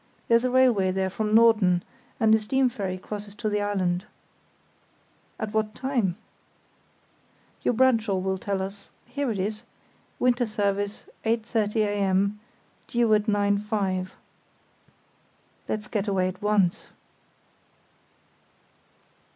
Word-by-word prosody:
There's 230 0 +5
a 255 - +1
railway 245 -7 +4
there 190 0 -1
from 215 +2 0
Norden, 215 -6 +5 0.4
and 220 -2 +4
a 220 - +5
steam 260 +4 +1
ferry 190 -5 -4
crosses 205 +1 -8
to 215 +1 -2
the 210 0 0
island." 190 -2 -1 1.3
"At 215 0 -4
what 215 -1 -1
time?" 240 -9 -1 1.4
"Your 245 - +1
Bradshaw 230 -5 +3
will 190 0 -1
tell 195 -1 -2
us—here 240 +7 -6
it 215 - -2
is: 210 +3 -2 0.6
'Winter 245 -1 +2
Service, 205 -1 -1 0.2
8.30 225 -1 0
a.m., 200 0 +1 0.5
due 235 -3 +2
at 210 -1 +3
9.5.'" 205 -2 0 1.6
"Let's 215 0 -2
get 210 -2 -2
away 185 -2 +1
at 185 - -10
once." 205 -4 +1
210 Hz, 110 wpm, -26 LUFS, 195-225 Hz, 1.6 s, There's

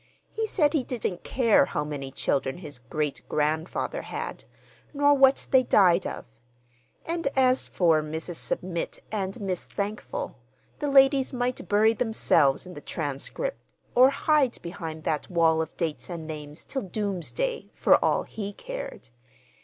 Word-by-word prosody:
He 445 0 -1
said 300 -8 +2
he 295 -5 +1
didn't 220 -8 -4
care 235 -5 +4
how 150 - -2
many 145 -2 -5
children 135 +1 -1
his 150 -7 -8
great 140 +2 -3
grandfather 160 - -1
had, - - -6 0.5
nor 285 0 +5
what 270 -1 +5
they 260 - +7
died 185 -7 +4
of; - - -6 0.8
and 335 -2 -2
as 260 -1 +3
for 165 -4 +3
Mrs. 160 +2 -4
Submit 175 -2 -3
and 195 0 -3
Miss 190 -4 -3
Thankful, 210 - -4 0.4
the 295 - -1
ladies 270 -1 +5
might 250 0 -2
bury 215 +2 +4
themselves 195 - +2
in 180 - -9
the 145 - -9
"Transcript," 155 - -5 0.2
or 255 +2 +7
hide 280 -2 +2
behind 165 -2 -6
that 150 -1 -2
wall 165 -2 +3
of 160 - -6
dates 165 0 -3
and 170 -3 -5
names 150 -1 -7
till 270 - -3
doomsday, 205 - -2
for - - +4
all - - +2
he 205 -2 -6
cared. - - -7
195 Hz, 145 wpm, -26 LUFS, 160-265 Hz, 0.8 s, they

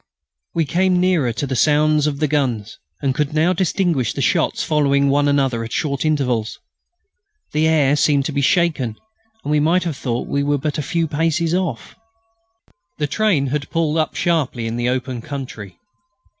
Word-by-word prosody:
We 165 -1 +2
came 180 +4 +2
nearer 180 -9 +2
to 140 - -3
the 135 -1 -3
sounds 150 +2 +3
of 145 -2 -2
the 150 +1 0
guns 125 -8 -2 0.2
and 135 -1 +1
could 150 +3 -2
now 165 +4 +3
distinguish 170 - 0
the - - -4
shots - - +1
following 140 -2 +2
one 145 +1 +2
another 135 -5 +1
at 115 - -7
short 140 -1 -1
intervals. 125 -8 0 0.9
The 155 +1 +2
air 145 -3 +3
seemed 145 -1 +2
to 155 - -2
be 140 0 -1
shaken, 145 - +1 0.5
and 150 - -3
we 150 - +3
might 165 +5 +2
have 165 -4 -3
thought 120 -2 -3
we 140 - 0
were 145 +1 +1
but 150 +2 -3
a - - 0
few 165 +4 -1
paces 165 +2 0
off. 175 -10 -3 1.0
The 150 - 0
train 170 -3 +1
had 145 -1 -2
pulled 165 -2 0
up 155 - -1
sharply 145 -9 0
in 115 0 -3
the 120 +1 0
open 125 -1 -3
country. 125 -7 -7
145 Hz, 180 wpm, -20 LUFS, 135-160 Hz, 1.0 s, sounds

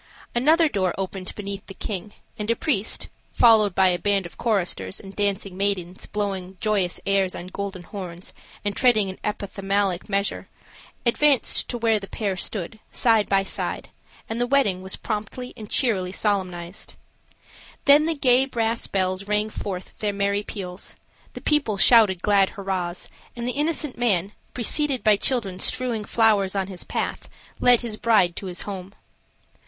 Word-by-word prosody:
Another 315 +7 +4
door 190 - 0
opened 190 -1 -4
beneath 200 -1 -6
the 195 - -9
king, 205 0 -5 0.3
and 210 +1 -3
a 230 - +3
priest, 230 -9 0 0.3
followed 215 -5 +5
by 190 -1 +5
a 175 -1 0
band 200 +1 +1
of 170 -3 -10
choristers, 180 - -1
and 195 0 -11
dancing 200 -2 -1
maidens 190 -2 -2
blowing 195 -3 -3
joyous 200 -5 0
airs 195 -2 +1
on 175 - -6
golden 190 -1 -6
horns 180 -2 -8 0.3
and 205 -1 -1
treading 215 -6 +3
an 185 - -13
epithalamic 200 -2 -1
measure, 200 0 -1 0.6
advanced 275 +3 +3
to 245 - -2
where 225 -2 +2
the 195 - -9
pair 200 -1 -2
stood, 195 +3 -3
side 225 -3 +3
by 195 -1 +3
side, 195 - -4 0.4
and 225 +2 -3
the 245 - +1
wedding 245 -9 +2
was 190 0 -2
promptly 220 +4 -5
and 215 -3 -10
cheerily 195 -8 +1
solemnized. 185 -3 -2 0.9
Then 290 +2 +6
the 330 - 0
gay 260 -2 +4
brass 230 -3 -1
bells 185 0 -1
rang 210 +1 +1
forth 185 -3 -6
their 210 -1 -1
merry 200 0 0
peals, 190 -3 -7 0.4
the - - -8
people 285 -9 +1
shouted 205 -5 +6
glad 200 -2 +4
hurrahs, 185 -3 -3 0.3
and 240 0 -4
the - - +1
innocent 300 -3 -1
man, 200 -5 +2 0.2
preceded 265 +2 0
by 215 -2 +6
children 200 -5 0
strewing 245 -2 -1
flowers 205 -4 +3
on 195 -1 0
his 185 -2 -7
path, - - -4 0.3
led 245 -1 +6
his 225 -3 -5
bride 210 -8 +3
to 195 - -5
his 180 -1 -3
home. 195 -1 -7
200 Hz, 160 wpm, -24 LUFS, 190-230 Hz, 0.9 s, Then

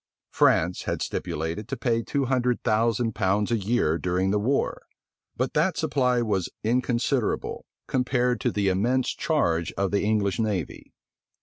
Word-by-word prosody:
France 90 +3 +2
had - - -2
stipulated 80 +7 -3
to - - -4
pay 115 -2 0
two 140 +3 -1
hundred 125 -1 0
thousand 115 +1 +1
pounds 105 +1 0
a - - +3
year 100 -6 +1
during 90 +2 0
the 105 - +2
war; 130 +7 0 0.6
but - - -1
that - - +1
supply 125 -3 +1
was 100 -5 -1
inconsiderable, 125 +1 0 0.2
compared 125 -1 0
to 125 - +1
the 100 -2 0
immense 120 +7 +1
charge 85 - 0
of 100 -1 -1
the 100 - +1
English 105 -1 0
navy. 105 -8 -3
110 Hz, 145 wpm, -25 LUFS, 95-125 Hz, 0.6 s, a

